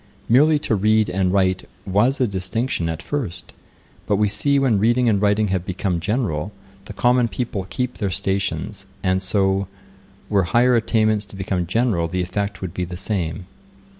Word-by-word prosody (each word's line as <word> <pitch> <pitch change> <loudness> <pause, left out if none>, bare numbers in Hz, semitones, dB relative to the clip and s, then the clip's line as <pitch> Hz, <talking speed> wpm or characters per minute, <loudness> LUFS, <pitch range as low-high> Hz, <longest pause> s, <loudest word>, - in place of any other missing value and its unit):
Merely 150 +6 +5
to 145 - -2
read 110 0 +2
and 95 0 +1
write 95 -1 +1 0.2
was 105 +9 +2
a 130 - +3
distinction 95 -1 -2
at 80 +1 -5
first; 100 -12 -4 0.5
but 105 - +2
we 105 +1 +2
see 140 +8 +1
when 130 -7 +2
reading 120 +4 +3
and 100 -3 +2
writing 105 0 +2
have 95 -2 0
become 95 -1 -2
general, 95 - -1 0.3
the 105 - -8
common 125 +3 +3
people 110 -6 -4
keep 125 -1 -3
their 100 -3 0
stations. 95 +1 -2 0.2
And 95 0 +1
so, 95 0 +1 0.6
were 100 -3 +2
higher 125 +1 +5
attainments 110 -2 +2
to 100 - -13
become 95 -2 -2
general 105 -4 +1
the 90 +2 -2
effect 100 +1 -3
would 90 -2 -4
be 90 - -2
the 90 0 -6
same.' 90 -3 -2
100 Hz, 170 wpm, -21 LUFS, 95-115 Hz, 0.6 s, Merely